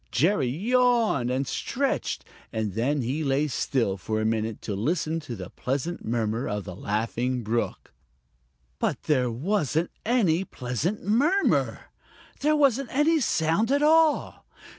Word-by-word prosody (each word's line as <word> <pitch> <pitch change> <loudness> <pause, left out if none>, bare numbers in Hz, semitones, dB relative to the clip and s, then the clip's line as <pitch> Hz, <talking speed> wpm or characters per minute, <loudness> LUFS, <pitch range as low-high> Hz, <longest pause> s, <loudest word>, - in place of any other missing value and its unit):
Jerry 150 - +2
yawned 230 - +2
and 130 +2 0
stretched, - - -2 0.3
and 110 -3 -2
then 130 +6 0
he 135 +7 -2
lay 140 +1 +1
still 120 -7 0
for 110 +3 -2
a 110 - -1
minute 110 0 -1
to 105 - -3
listen 155 - -1
to 130 -6 -7
the 95 -3 -8
pleasant 140 +7 -3
murmur 115 +1 -1
of 105 -1 -3
the 90 -2 -8
Laughing 115 +5 -2
Brook. 115 +2 -2 0.9
But - - -1
there 130 -5 +2
wasn't 160 - 0
any 195 -8 +2
pleasant 140 - -3
murmur. 290 - +1 0.5
There 305 +1 +2
wasn't 275 -3 +2
any 310 +4 +3
sound 200 - +1
at 285 +1 +3
all. 315 0 +3
145 Hz, 140 wpm, -26 LUFS, -, 0.9 s, any